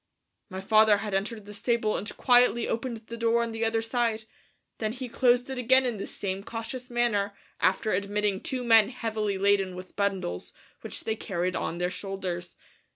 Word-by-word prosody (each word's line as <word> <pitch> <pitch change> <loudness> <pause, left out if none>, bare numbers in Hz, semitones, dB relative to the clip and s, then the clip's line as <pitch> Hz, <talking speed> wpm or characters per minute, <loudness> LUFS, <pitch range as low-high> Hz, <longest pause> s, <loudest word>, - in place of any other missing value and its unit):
My 190 0 -5
father 215 +1 +5
had 205 0 -4
entered 210 +2 -2
the 210 - -9
stable 230 -1 0
and 210 - -5
quietly 245 -2 +4
opened 230 -1 -3
the 235 - -7
door 230 0 +2
on 230 - -3
the 225 0 -3
other 225 0 +1
side, 230 -2 0 0.6
then 215 -1 -1
he 255 0 -5
closed 245 +1 +3
it 260 - -4
again 260 +2 +4
in 240 -3 -1
the 195 - -5
same 195 0 -4
cautious 235 +4 -6
manner 220 -4 0 0.2
after 205 +3 +2
admitting 200 +1 0
two 255 -2 -2
men 225 -3 +6
heavily 220 -5 -2
laden 195 -1 +2
with 185 0 -10
bundles 195 - -2 0.3
which - - -5
they 220 - -1
carried 185 -4 -2
on 165 - -2
their 180 +1 -1
shoulders. 185 -3 -5
220 Hz, 180 wpm, -28 LUFS, 195-235 Hz, 0.6 s, men